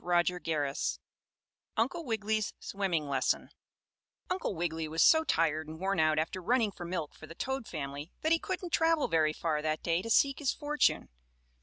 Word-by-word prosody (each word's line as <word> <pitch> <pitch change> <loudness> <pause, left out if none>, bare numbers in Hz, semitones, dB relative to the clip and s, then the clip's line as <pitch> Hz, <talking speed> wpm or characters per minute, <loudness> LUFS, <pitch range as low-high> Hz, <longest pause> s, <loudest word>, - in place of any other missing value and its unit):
STORY 175 0 +3
XXI 145 - -1 0.8
UNCLE 270 +10 0
WIGGILY'S 220 -2 -1
SWIMMING 180 -7 -1
LESSON 135 -2 0 0.8
Uncle 365 - -1
Wiggily 160 -1 -2
was 160 +1 +2
so 320 0 +6
tired 160 - +1
and 160 +1 -8
worn 195 -1 0
out 155 -1 +3
after 165 +4 -1
running 225 +2 +2
for 175 - -8
milk 170 -4 -3
for 155 - -12
the 165 - -10
toad 265 +3 -3
family 145 0 -5
that 315 - 0
he 330 - +5
couldn't 360 -2 -4
travel 325 -2 +3
very 155 -2 +3
far 155 -1 -1
that 155 0 -2
day 170 +1 +1
to 230 - -6
seek 275 +4 +4
his 280 -3 +1
fortune. 295 0 +1
175 Hz, 175 wpm, -31 LUFS, 155-240 Hz, 0.8 s, so